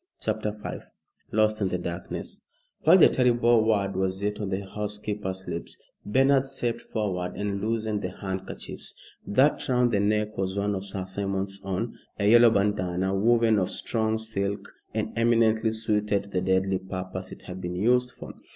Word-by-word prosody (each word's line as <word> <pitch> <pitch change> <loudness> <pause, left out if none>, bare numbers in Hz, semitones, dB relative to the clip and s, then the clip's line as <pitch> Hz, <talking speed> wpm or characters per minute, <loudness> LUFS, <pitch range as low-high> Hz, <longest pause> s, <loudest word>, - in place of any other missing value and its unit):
CHAPTER 110 -1 -1
V - - -4 0.5
LOST 110 0 +2
IN 100 - +2
THE 90 - -1
DARKNESS 85 +1 -6 0.4
While 165 +4 +8
the 180 - +8
terrible 120 -2 +3
word 100 -3 +1
was 95 +1 -1
yet 105 +1 -1
on 100 - -2
the 95 +1 -2
housekeeper's 105 -2 -4
lips, 85 - -5 0.3
Bernard 135 +4 +3
stepped 120 -3 -2
forward 95 -5 -3
and 100 -1 -2
loosened 110 -1 -1
the - - -2
handkerchiefs. 95 -1 -6 0.3
That 135 +7 +2
round 125 -1 +3
the 105 - +2
neck 105 +1 +1
was 95 0 -1
one 100 +1 0
of 95 0 -4
Sir 95 -1 -4
Simon's 95 0 -3
own, 95 +4 -3 0.2
a 100 - +1
yellow 120 +2 +8
bandana 95 -3 0
woven 115 +1 +3
of 95 - 0
strong 110 -1 -1
silk, 100 -3 -4 0.2
and - - -2
eminently 115 -1 +3
suited 105 -2 0
to 100 - -14
the 95 -2 -1
deadly 95 0 +1
purpose 95 0 -6
it - - -11
had 95 0 -8
been 90 0 -4
used 125 +6 +3
for. - - -9
105 Hz, 170 wpm, -26 LUFS, 95-110 Hz, 0.5 s, While